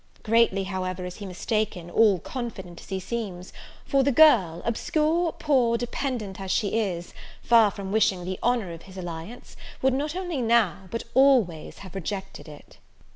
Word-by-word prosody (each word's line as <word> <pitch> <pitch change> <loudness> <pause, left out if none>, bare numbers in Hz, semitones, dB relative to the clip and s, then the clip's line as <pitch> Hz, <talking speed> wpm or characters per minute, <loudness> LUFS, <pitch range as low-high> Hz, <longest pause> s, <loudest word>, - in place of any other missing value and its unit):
Greatly, 225 -3 +3
however, 185 -1 -4
is 180 0 -7
he 205 - -7
mistaken, 190 -1 -2
all 210 -2 +4
confident 190 - -7
as - - -15
he 190 -1 -2
seems; 190 -3 -5 0.3
for 275 -2 +2
the 280 +1 +2
girl, 225 - +5
obscure, 315 +8 +1
poor, 255 -6 +2
dependent 240 -5 -4
as 190 - -6
she 205 +1 +1
is, 175 -5 -3 0.3
far 230 -3 +6
from 195 -1 -7
wishing 195 -4 +2
the 185 0 -4
honour 235 -6 0
of 165 0 -9
his 190 - -12
alliance, 175 +6 -8 0.2
would 265 0 +2
not 295 +4 -2
only 355 -7 -3
now, 225 -6 +2
but 230 +4 -4
always 250 - +3
have 190 - -11
rejected 195 0 -6
it. 150 -1 -14
210 Hz, 165 wpm, -26 LUFS, 185-245 Hz, 0.3 s, far